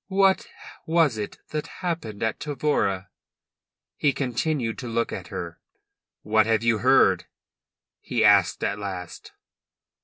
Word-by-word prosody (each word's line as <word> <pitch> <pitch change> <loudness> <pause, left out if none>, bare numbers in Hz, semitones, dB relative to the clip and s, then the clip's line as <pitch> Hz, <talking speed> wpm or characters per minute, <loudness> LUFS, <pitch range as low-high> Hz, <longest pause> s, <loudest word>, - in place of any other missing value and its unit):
"What 195 0 +3 0.4
was 160 -7 +3
it 105 - -5
that 150 -1 -3 0.2
happened 115 - -3
at 115 - -1
Tavora?" 125 -10 -1 0.9
He 145 -2 +2
continued 125 -2 -1
to 125 - -6
look 115 0 -1
at - - -6
her. 85 -1 -6 0.6
"What 110 0 +3
have 110 -1 +2
you 115 -2 +2
heard?" 130 +3 +4 0.7
he - - 0
asked - - +4
at 100 - -1
last. 95 -4 -7
115 Hz, 125 wpm, -25 LUFS, 105-150 Hz, 0.9 s, heard